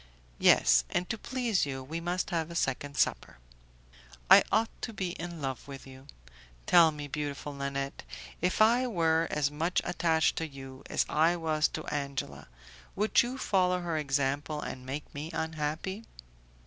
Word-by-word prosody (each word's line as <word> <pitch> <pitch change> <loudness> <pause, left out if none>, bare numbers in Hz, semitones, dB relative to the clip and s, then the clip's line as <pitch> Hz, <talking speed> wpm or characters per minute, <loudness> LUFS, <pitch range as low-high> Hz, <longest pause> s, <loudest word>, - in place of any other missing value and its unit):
"Yes, 60 0 +5
and 180 - -1
to 230 - -3
please 235 - 0
you 135 -1 -5
we 160 +5 -5
must 180 +2 -2
have 165 -2 -1
a 170 - -8
second 140 -1 -2
supper." - - 0 0.9
"I - - +10
ought 225 +1 +2
to 225 - -4
be 190 -3 -3
in 170 -3 -7
love 135 -1 -4
with 135 -1 -9
you. 135 0 -13 0.6
Tell 170 -2 +7
me, 150 -2 -6
beautiful 145 -1 -4
Nanette, 140 0 -4 0.4
if 180 +5 +3
I 240 +3 +4
were 165 -6 +2
as 145 -1 0
much 165 +5 0
attached 165 -2 +1
to 165 - -2
you 135 -2 -10
as - - +1
I 165 +3 +3
was 155 -2 +1
to - - -6
Angela, 140 - -4 0.5
would 210 +2 +3
you 245 +2 -4
follow 180 -6 +1
her 170 -2 -2
example 140 +1 -1
and 130 -3 -7
make 145 +3 -6
me 150 +2 -5
unhappy?" 160 +7 -3
155 Hz, 160 wpm, -30 LUFS, 140-175 Hz, 0.9 s, I